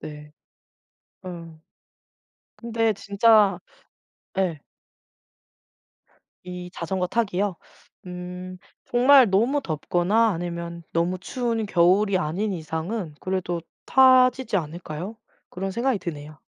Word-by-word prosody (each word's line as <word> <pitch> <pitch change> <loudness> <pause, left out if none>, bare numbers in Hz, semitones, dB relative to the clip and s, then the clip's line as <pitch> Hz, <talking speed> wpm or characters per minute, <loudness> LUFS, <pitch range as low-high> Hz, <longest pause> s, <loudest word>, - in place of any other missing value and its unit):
네. 150 0 -10 0.9
어. 165 -3 -9 1.0
근데 225 -1 0
진짜 205 +1 +3 0.8
예. 170 -6 0 1.8
이 180 0 -7
자전거 180 +2 -2
타기요? 205 -2 0 0.5
음. 180 +1 -7 0.3
정말 255 -1 +6
너무 235 +9 +2
덥거나 180 - +1
아니면 170 -1 -4
너무 170 +2 0
추운 230 +1 -2
겨울이 190 +2 +3
아닌 185 +6 -2
이상은 160 +2 -4
그래도 185 -2 -2 0.2
타지지 255 -2 +5
않을까요? 170 +5 -6 0.3
그런 195 +2 -4
생각이 235 +2 0
드네요. 150 -3 -7
185 Hz, 200 characters per minute, -24 LUFS, 170-225 Hz, 1.8 s, 정말